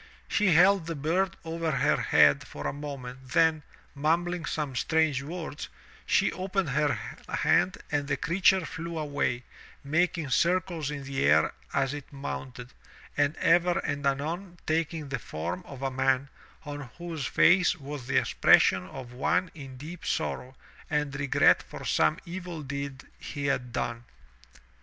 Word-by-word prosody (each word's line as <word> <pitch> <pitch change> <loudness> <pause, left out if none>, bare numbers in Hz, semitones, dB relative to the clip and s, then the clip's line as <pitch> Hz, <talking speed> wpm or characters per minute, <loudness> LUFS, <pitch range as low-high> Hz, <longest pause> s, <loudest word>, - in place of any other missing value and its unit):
She 210 - +2
held 180 +1 +5
the 165 - -3
bird 175 +7 0
over 165 0 -2
her 135 -4 +2
head 70 -1 +4
for 75 - -8
a - - -1
moment, 135 -3 -7
then, 160 -1 +4 0.3
mumbling 165 +4 0
some 150 -5 -3
strange 155 +1 +2
words, 155 0 -6 0.4
she - - +3
opened 190 -2 -2
her 145 -1 +2 0.3
hand 185 - +2
and 145 -1 0
the 145 -1 0
creature 185 +3 +3
flew 170 -1 -5
away, 140 -5 -1 0.4
making 155 0 0
circles 170 -1 +1
in 145 -2 -5
the 135 0 -2
air 75 +2 +4 0.2
as 135 0 0
it 145 -2 -8
mounted, 130 -3 -6 0.4
and 145 +1 +2
ever 175 0 +3
and 145 -1 -1
anon 170 +7 -2
taking 160 -2 -1
the 135 -2 -2
form 85 -1 -4
of 135 -1 -9
a 135 - 0
man 135 +1 +1 0.4
on 145 -3 -6
whose 165 -5 -4
face 180 0 +4
was 140 -3 -7
the - - +1
expression 95 -1 +4
of 125 +2 -9
one 180 +8 0
in 135 -5 -10
deep 160 +6 -9
sorrow 130 -4 -2 0.3
and 150 -2 0
regret 140 -2 +4
for - - -10
some 80 -1 +2
evil 175 -2 -6
deed 140 -1 -5 0.2
he 140 -1 -5
had 125 -3 -1
done. 120 -1 -3
145 Hz, 150 wpm, -28 LUFS, 135-170 Hz, 0.4 s, held